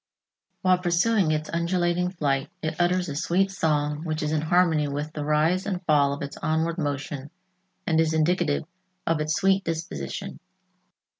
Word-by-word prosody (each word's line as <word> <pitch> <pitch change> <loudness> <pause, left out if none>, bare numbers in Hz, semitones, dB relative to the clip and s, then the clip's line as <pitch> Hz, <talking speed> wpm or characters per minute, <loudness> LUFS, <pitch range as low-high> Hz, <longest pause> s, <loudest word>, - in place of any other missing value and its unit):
While 185 -1 +4
pursuing 180 +2 +2
its 155 0 0
undulating 175 +1 +1
flight, 140 -6 -1
it 155 +2 -1
utters 180 +1 +2
a 145 - -4
sweet 180 +5 +1
song 150 -4 0
which 155 -2 -2
is 150 - -1
in 155 -1 +1
harmony 160 -2 +3
with 145 +2 -4
the 150 - -4
rise 155 +6 +2
and 190 -3 -1
fall 145 -3 +4
of 140 +1 -4
its 140 - -6
onward 165 +2 0
motion 145 -1 -3 0.6
and 160 -1 +2
is 160 -1 +1
indicative 160 -1 +1 0.4
of 165 -2 +1
its 155 0 0
sweet 195 0 +3
disposition. 160 - -5
160 Hz, 160 wpm, -25 LUFS, 150-175 Hz, 0.6 s, While